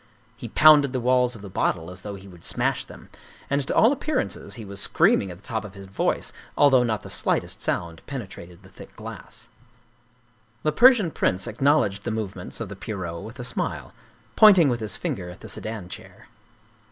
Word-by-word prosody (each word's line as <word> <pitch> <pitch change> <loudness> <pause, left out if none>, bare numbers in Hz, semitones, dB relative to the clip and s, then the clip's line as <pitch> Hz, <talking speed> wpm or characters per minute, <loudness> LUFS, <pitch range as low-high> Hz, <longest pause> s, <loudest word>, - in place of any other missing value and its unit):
He 120 -1 -8
pounded 145 0 +6
the 130 - 0
walls 125 0 +2
of 105 - -11
the - - -7
bottle 85 -1 -1
as 90 +1 -9
though 105 -1 -6
he 100 0 -12
would 90 -3 -15
smash - - 0
them; - - -14 0.4
and 140 0 +2
to - - -1
all 225 - +6
appear 300 +2 -2
ances - - -3
he 115 -3 -8
was 100 0 -5
screaming 95 - +3
at 90 - -8
the 100 - -23
top 110 -1 -3
of 105 -2 -10
his 100 0 -10
voice, 95 +1 -1 0.2
although 135 -3 +6
not 110 -4 -1
the - - -10
slightest - - -1
sound 85 -1 -2
penetrated 95 -8 -8
the 95 - -16
thick - - -14
glass. - - -10 1.2
The 155 - +2
Persian 230 - +5
prince 95 -8 0
acknowledged 120 -4 +1
the - - -3
movements 100 -5 -4
of 115 - -4
the 100 - -7
Pierrot 95 -5 -5
with 115 +4 -10
a - - -4
smile, 120 - -3 0.4
pointing 190 -8 +7
with 120 -2 -1
his 105 -4 -3
finger 90 -2 -4
at 90 - -12
the - - -10
sedan 110 -4 -6
chair. - - -12
110 Hz, 200 wpm, -24 LUFS, 95-130 Hz, 1.2 s, pointing